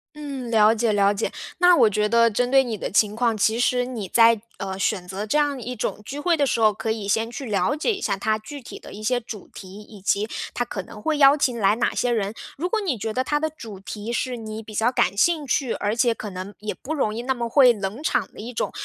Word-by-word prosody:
嗯， 280 -5 -6
了 220 -1 +5
解 230 0 +1
了 200 0 +3
解。 205 - -2 0.3
那 355 0 +6
我 225 - +5
觉 210 +1 0
得 230 +1 +5
针 245 +4 0
对 270 +1 +5
你 235 -4 -3
的 - - -4
情 210 0 +2
况， 230 -1 +1
其 220 +3 +2
实 245 0 +2
你 235 -6 -5
在， 230 +2 +5 0.2
呃， 190 -1 -4
选 190 -2 -1
择 195 +3 -4
这 255 - +1
样 290 -3 +1
一 250 +2 -5
种 210 - -3
聚 275 +6 -6
会 345 +3 +2
的 290 -3 +2
时 235 - 0
候， 215 -1 +4
可 220 - -4
以 220 -2 -2
先 225 +3 +1
去 265 +3 -7
了 215 +5 0
解 315 +9 0
一 395 - -6
下 200 -2 -1
它 215 +2 0
具 280 +7 -9
体 245 - -10
的 - - -12
一 215 - -9
些 245 +3 +1
主 220 -4 -9
题， 190 +1 -10
以 210 -1 -14
及 200 +2 +1 0.3
它 245 - 0
可 210 -4 -5
能 190 - -12
会 310 +5 0
邀 280 +1 +7
请 255 -4 +1
来 200 0 +3
哪 235 - 0
些 245 - 0
人。 215 -3 -1 0.2
如 335 +6 -1
果 435 +4 0
你 335 - -1
觉 220 +1 -4
得 255 - 0
它 295 +3 0
的 315 - 0
主 225 -10 -10
题 210 +3 -6
是 245 +1 -2
你 220 -1 -7
比 215 0 -11
较 225 +3 +2
感 195 -6 +1
兴 310 +7 +2
趣， 260 -1 0
而 205 +2 -1
且 240 0 +3
可 215 - -6
能 185 +2 -7
也 210 0 -4
不 315 +4 -5
容 220 -7 0
易 235 - -3
那 265 +2 0
么 235 -1 -3
会 255 +1 +6
冷 205 +4 -5
场 315 - 0
的 - - -13
一 230 +3 -6
种， 235 - -2
230 Hz, 290 characters per minute, -23 LUFS, 210-260 Hz, 0.3 s, 邀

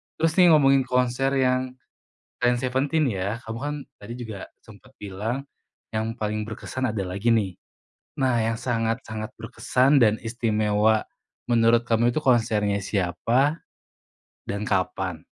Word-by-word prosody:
Terus 165 0 +1
nih 180 - +8
ngomongin 135 -2 +4
konser 125 +2 +1
yang 130 -1 +1 0.7
selain 120 0 +3
Seventeen 135 +5 0
ya, 100 +1 -2
kamu 110 +1 -5
kan 145 +1 -2 0.3
tadi 105 +3 -8
juga 110 -5 -7 0.2
sempat 110 +4 -16
bilang 105 +7 -4 0.5
yang 110 +1 -2
paling 110 -1 -2
berkesan 130 +3 -4
ada 105 -2 -2
lagi 100 +5 -1
nih. 105 -5 +2 0.7
Nah, 120 -4 +2
yang 115 0 -2
sangat-sangat 115 -1 -2
berkesan 130 +3 +2
dan 110 0 +2
istimewa 110 -2 +1 0.4
menurut 115 -1 +4
kamu 115 +1 +3
itu 155 - -1
konsernya 110 -6 +2
siapa 115 - 0 0.8
dan 100 +1 -3
kapan? 95 -4 -2
115 Hz, 130 wpm, -24 LUFS, 105-130 Hz, 0.8 s, nih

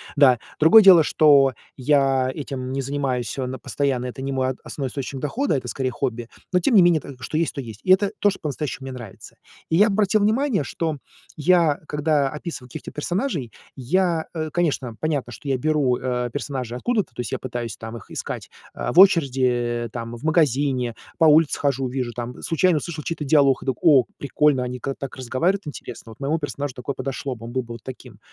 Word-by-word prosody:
Да, 130 -5 +5 0.2
другое 165 +8 +8
дело, 180 -5 +8
что 140 -3 +5 0.2
я 135 -1 +2
этим 130 -3 -5
не 135 0 -2
занимаюсь 135 -3 -2
всё 130 -2 -3
на 130 +1 -5
постоянно 135 -3 -1
это 125 +1 -6
не 135 0 -3
мой 130 -1 0
от 130 -1 -3
основной 140 -2 -4
источник 135 +1 -5
дохода, 225 - -1
это, 125 -2 -6
скорее, 130 +1 -2
хобби. 120 -2 -3 0.2
Но 180 - +5
тем 235 +7 +2
не 195 - +8
менее 175 -3 +4 0.2
что 130 +6 -4
есть, 165 0 0
то - - -6
есть. 115 -5 -8
И 185 - +2
это 195 +1 +4
то, 205 - +4
что 195 - -5
по-настоящему 145 -2 -4
мне 130 - -6
нравится. 120 -6 -11 0.3
И 160 - +1
я 205 +5 +6
обратил 210 0 +2
внимание, 220 - +1
что 160 +3 -3 0.4
я, 165 -1 +3
когда 150 -2 +1
описываю 150 -3 -7
каких-то - - -8
персонажей, 165 - -2 0.2
я, 165 +5 0
э, 155 -2 -3
конечно, 140 -9 -1
понятно, 145 -6 -2
что 140 - -8
я 135 - +1
беру, 140 -2 +1
э, 125 -1 -2
персонажей 130 -4 -4
откуда-то, 210 - -1
то - - -17
есть 120 -3 -3
я - - 0
пытаюсь, 120 -3 -5
там, 110 +1 -8
их 115 - -14
искать, - - -6 0.3
э, - - -3
в 175 - +5
очереди, 125 - +3
там, 115 0 -6
в 120 - -12
магазине, 140 -6 +1 0.2
по 165 - +4
улице 155 0 +5
хожу, 135 -2 0
вижу, 125 -2 -3
там, 120 +1 -6
случайно 165 0 +2
услышал 155 -1 -5
чей-то 160 -1 -4
диалог 140 -2 +4
и - - -12
так: 130 -2 0
"О, 140 -7 +6
прикольно, 140 -2 +1
они 125 0 -5
ка 135 +2 -4
так 135 -2 -7
разговаривают 155 +10 -1
интересно, 120 -5 -8
вот 115 - -15
моему 150 +4 0
персонажу 145 -2 -4
такое 130 +2 -5
подошло 135 0 -4
бы, 115 0 -11
он 115 - -7
был 130 +1 -1
бы 115 - -9
вот 115 - -11
таким". 130 -1 -10
140 Hz, 210 wpm, -23 LUFS, 125-160 Hz, 0.4 s, другое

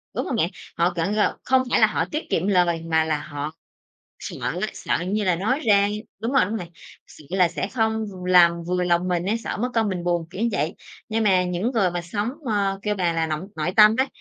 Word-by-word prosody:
đúng - - -1
hông - - -2
bạn? - - +1 0.3
Họ 175 +1 +2
cảng 180 +5 -1
gọi 210 - +2
không 260 0 +3
phải - - +4
là - - +6
họ - - -1
tiết 305 +2 -5
kiệm 180 - 0
lời 175 -4 +2
mà 160 -1 +2
là 155 -2 0
họ 145 +1 -5 0.7
sợ - - -7
á, - - -1
sợ - - -1
như 205 +2 0
là 180 -2 +2
nói 225 - 0
ra 200 -6 +4 0.3
đúng 230 +4 -2
rồi, 265 - +4
đúng 215 +4 -3
rồi, 180 - -5 0.4
sợ 150 - -16
là 185 -2 +3
sẽ 190 - -3
không 220 -2 0
v 185 -2 -9
làm 170 -2 +5
vừa 180 0 0
lòng 175 +1 +1
mình 175 -1 0
á, 210 - +1
sợ - - -3
mất 245 +4 -2
công 225 -2 +2
mình 180 -3 -3
buồn, 175 -2 0
kiểu 190 +4 -5
vậy. 150 +1 -1 0.3
Nhưng 225 0 0
mà 185 -3 +4
những 180 +6 -1
người 200 -7 +2
mà 175 - -3
sống, 205 +5 -3 0.2
ơ, 200 -4 0
kêu 210 -1 0
bà 180 -4 0
là 165 0 0
nội- 155 +4 -3
nội 155 +3 -1
tâm 215 0 +8
á, 265 - +3
185 Hz, 245 wpm, -23 LUFS, 170-215 Hz, 0.7 s, tâm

